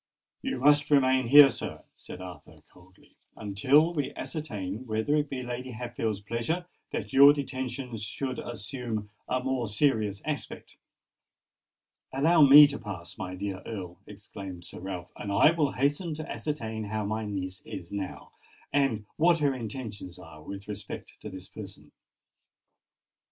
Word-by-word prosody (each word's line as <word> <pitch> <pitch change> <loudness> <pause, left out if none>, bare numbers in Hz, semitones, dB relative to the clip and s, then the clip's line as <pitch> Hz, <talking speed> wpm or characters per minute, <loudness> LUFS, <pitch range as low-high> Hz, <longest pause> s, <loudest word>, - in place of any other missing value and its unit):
"You - - -2
must 145 +3 +4
remain 130 -3 +4
here, 145 +2 +10
sir," - - -5
said 90 - -10
Arthur 90 -5 -10 0.2
coldly, 95 +1 -21 0.2
"until 130 - +3
we 145 -4 -2
ascertain 110 - -5
whether 110 +7 +1
it 150 -1 +1
be 130 -2 -4
Lady 125 +1 -5
Hatfield's 115 -3 -3
pleasure 115 - -2 0.3
that - - -4
your 140 +2 +9
detention 130 -3 -4
should 125 +5 -4
assume 115 -2 -5 0.2
a 130 0 0
more 130 -3 -1
serious 105 -3 +1
aspect." 150 -1 -5 1.3
"Allow 160 +5 +4
me 145 +1 +11
to 140 -1 -2
pass, 85 -6 -7
my 90 -1 -4
dear 95 0 -4
Earl," 90 -6 -7
exclaimed 95 -3 -9
Sir - - -9
Ralph; 90 -1 -6
"and 100 - -5
I 100 +10 +6
will 155 -4 +1
hasten 145 +5 0
to 155 +1 -6
ascertain 110 -8 -3
how 105 0 -2
my 110 +2 -2
niece 95 -3 -4
is 85 - -8
now, 100 -2 -5 0.4
and 135 -7 +1
what 170 +1 +5
her 145 -3 +2
intentions 110 -6 -6
are 80 -4 -12
with 100 +5 -8
respect 105 -1 -7
to 105 - -6
this 95 -1 -8
person." 95 -10 -10
115 Hz, 145 wpm, -28 LUFS, 100-140 Hz, 1.3 s, me